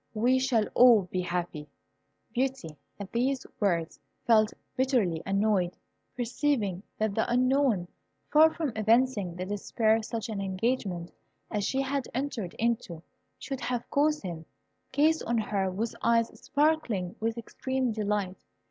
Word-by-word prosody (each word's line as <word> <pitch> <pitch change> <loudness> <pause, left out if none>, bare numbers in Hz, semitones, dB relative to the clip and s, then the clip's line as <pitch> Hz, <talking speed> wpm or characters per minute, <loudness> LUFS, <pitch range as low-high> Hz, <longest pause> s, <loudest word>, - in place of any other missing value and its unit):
We 245 +4 +3
shall 250 -5 +2
all 240 -4 +7
be 185 - 0
happy." 175 -4 -3 0.6
Beauty, 255 - -2 0.2
at 200 -1 -7
these 255 +3 0
words, 170 -5 0 0.3
felt 215 -2 +4 0.2
bitterly 240 - +1
annoyed, 195 -2 +1 0.4
perceiving 240 -6 0 0.2
that 215 -1 0
the 220 +3 0
Unknown, 255 -6 +2 0.4
far 315 +1 +7
from 315 -5 -2
evincing 220 -4 +2
the 180 +1 -4
despair 220 +3 +1
such 225 +1 -4
an 210 -3 -4
engagement 190 -3 -2 0.4
as 205 -2 -1
she 270 +5 0
had 270 -1 -2
entered 250 -9 -3
into 220 -8 -1 0.3
should 270 -2 -5
have 245 -1 -2
caused 300 0 +2
him, 165 -3 -6 0.5
gazed 315 +2 +3
on 235 0 0
her 200 -3 0
with 215 +5 -3
eyes 230 0 +3
sparkling 285 - 0
with 225 +1 -1
extreme 260 +2 -2
delight. 205 -3 -2
225 Hz, 135 wpm, -28 LUFS, 195-260 Hz, 0.6 s, all